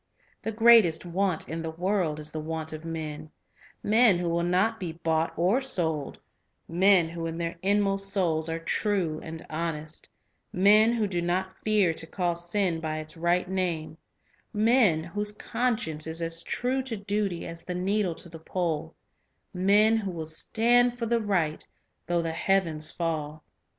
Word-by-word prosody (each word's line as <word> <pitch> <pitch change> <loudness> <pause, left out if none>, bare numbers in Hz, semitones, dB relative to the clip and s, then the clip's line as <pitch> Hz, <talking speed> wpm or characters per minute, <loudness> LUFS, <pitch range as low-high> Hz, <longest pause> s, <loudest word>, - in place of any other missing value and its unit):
The 225 - -3
greatest 220 -7 +5
want 180 0 -1
of 165 +1 -4
the 165 - -4
world 175 -2 -1
is 150 0 -4
the 155 - -4
want 160 0 -4
of 155 0 -7
men, 155 -2 -6 0.3
— - - -24 0.2
men 220 -2 +5
who 175 -1 -2
will 170 0 0
not 185 +6 +1
be 175 -4 -4
bought 165 -1 0
or 190 +10 +2
sold; 160 - -1 0.5
men 180 0 +4
who 165 0 -5
in 165 0 -5
their 170 0 -3
inmost 195 0 +2
souls 165 -5 +2
are 165 - -2
true 165 -2 -1
and 160 0 -8
honest; 155 -1 -4 0.4
men 210 +4 +5
who 225 -3 0
do 180 -4 -2
not 185 +2 -1
fear 210 -6 +3
to 165 - -6
call 175 0 -1
sin 175 0 -1
by 155 -1 -3
its 155 0 -6
right 175 +2 +1
name; 175 -5 -2 0.6
men 215 -7 +3
whose 205 +5 -1
conscience 215 -9 -2
is 160 +1 -3
as 165 0 -3
true 255 +7 -1
to 255 -4 -4
duty 200 -3 -2
as 165 0 -8
the 180 - -5
needle 190 -1 0
to - - -7
the 165 -1 -11
pole; 165 -2 -3 0.6
men 205 +4 +4
who 205 -3 -3
will 165 -3 -5
stand 240 +9 +2
for 235 - -2
the 230 0 +1
right 180 -7 -1 0.4
though 175 -1 +1
the 165 - -2
heavens 165 -3 0
fall. 155 -2 -3
175 Hz, 170 wpm, -27 LUFS, 160-205 Hz, 0.6 s, greatest